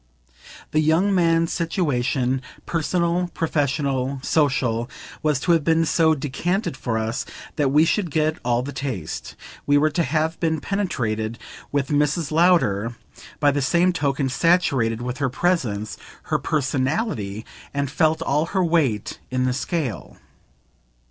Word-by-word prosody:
The 155 - +2
young 160 +6 +3
man's 165 -2 +2
situation, 135 -7 0 0.2
personal, 170 +1 0
professional, 140 -4 0
social, 125 -6 +1 0.3
was 150 -3 +1
to 175 - +2
have 165 -3 +3
been 165 +1 +3
so 160 0 +3
decanted 155 +6 -2
for 120 -3 -2
us 110 +1 -2 0.3
that 145 -4 +2
we 150 +4 +5
should 180 +1 0
get 155 +1 0
all 120 0 +1
the 140 - -5
taste; 115 - -5 0.3
we 145 0 +5
were 155 +2 +3
to 170 - 0
have 160 +2 0
been 160 -2 0
penetrated 115 - -2 0.3
with 140 -2 0
Mrs. 150 +1 +1
Lowder, 135 - +3 0.4
by 145 -1 +4
the 145 0 -1
same 175 +6 +3
token, 140 -3 0
saturated 130 -7 +2
with 125 +1 -4
her 140 -3 +1
presence, 120 - -1 0.3
her - - +3
"personality," 130 - -1 0.3
and 140 -1 -2
felt 160 +1 +2
all 150 +4 +1
her 185 - +3
weight 145 -11 0
in 130 0 0
the 130 - +1
scale. 140 - -3
145 Hz, 140 wpm, -23 LUFS, 130-165 Hz, 0.4 s, we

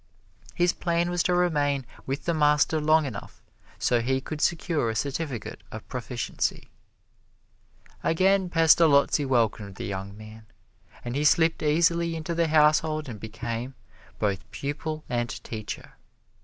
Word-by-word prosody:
His 175 -1 +2
plan 170 0 0
was 175 0 +1
to 180 - +1
remain 145 -6 +1 0.2
with 135 +2 -3
the 170 - +1
master 150 0 +3
long 155 +1 +4
enough 115 -7 -8 0.3
so 120 -1 +2
he 130 +3 0
could 150 +3 -6
secure 165 -7 +1
a 110 - -3
certificate 140 -1 -3
of - - -8
proficiency. - - -3 1.3
Again 190 +2 +2
Pestalozzi 160 -3 +4
welcomed 110 -6 0
the - - -6
young 100 +1 -5
man, 110 +1 -12 0.6
and 120 +1 -3
he 145 - 0
slipped 160 +2 +3
easily 170 +2 +2
into 160 +1 -3
the 165 0 +1
household 155 0 +3
and 110 -4 -7
became 115 +4 -5 0.4
both 100 -3 -2
pupil 155 +2 -4
and 120 -1 -1
teacher. 110 -2 -7
150 Hz, 135 wpm, -26 LUFS, 120-165 Hz, 1.3 s, long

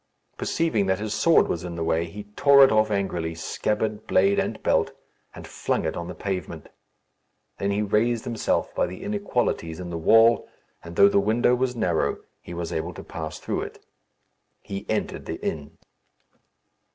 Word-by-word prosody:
Perceiving 135 -12 0
that 95 0 +2
his 105 +1 -3
sword 165 -1 +4
was 85 - -3
in 85 -1 -6
the 85 - -3
way, 80 0 +1
he 100 +5 -8
tore 140 -1 +7
it 135 - +6
off 110 0 +3
angrily, 90 -5 -2
scabbard, 105 +5 -2
blade, 100 +1 +3
and - - -3
belt, - - +2 0.4
and - - -9
flung - - -2
it - - -2
on 85 - -5
the 90 - -7
pavement. 95 0 -5 0.9
Then 100 - 0
he 100 +1 0
raised 110 +3 +1
himself 115 -2 -1
by - - +1
the 90 - -8
inequalities 125 - -1
in 90 -1 -6
the 85 - -3
wall, 115 +7 +5 0.3
and 85 0 -9
though 100 - +7
the 100 - +3
window 110 +4 +2
was 125 0 0
narrow, 90 -8 0 0.2
he 85 - -9
was 85 0 -4
able 80 +2 -3
to - - -8
pass 80 -1 -6
through - - -3
it. - - -9 0.8
He 100 0 -6
entered 110 - -2
the - - -3
inn. 75 0 -4
100 Hz, 175 wpm, -25 LUFS, 85-110 Hz, 0.9 s, tore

